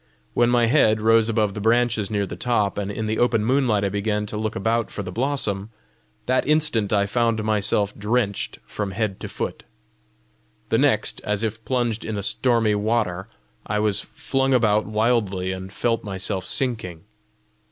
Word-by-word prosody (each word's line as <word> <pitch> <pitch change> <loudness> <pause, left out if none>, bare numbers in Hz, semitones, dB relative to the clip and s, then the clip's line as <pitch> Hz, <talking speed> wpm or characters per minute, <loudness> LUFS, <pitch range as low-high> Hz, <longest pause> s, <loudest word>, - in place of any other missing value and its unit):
When 120 0 +3
my 120 -1 +4
head 115 -4 +4
rose 115 +1 +4
above 110 -3 +1
the 105 - -5
branches 115 -2 +2
near 100 -2 0
the 90 - -7
top, 105 -1 0
and 100 -1 -3
in 110 +2 -3
the 110 0 -1
open 115 -3 +2
moonlight 125 -5 +2
I - - +1
began 105 +1 -1
to 105 - -7
look 110 +1 -2
about 115 +2 0
for 100 - -5
the 90 - -6
blossom, 110 -4 -1 0.6
that 130 +1 +1
instant 150 -9 +2
I 100 -1 +3
found 115 +1 0
myself 105 -1 +1
drenched 105 -1 -1
from 100 -2 -4
head 105 -2 -2
to - - -6
foot. - - -5 1.1
The - - +2
next, - - +1
as 105 +1 -1
if 110 0 -3
plunged 120 -3 -1
in 110 -2 -4
a 100 - -3
stormy 115 0 +2
water, 105 -3 0 0.4
I 105 - -1
was 105 -1 +1
flung 135 -1 -1
about 110 -3 +2
wildly, 105 -4 0
and 95 0 -6
felt 115 +2 -1
myself 95 -1 -3
sinking. 110 - -2
110 Hz, 175 wpm, -23 LUFS, 100-115 Hz, 1.1 s, my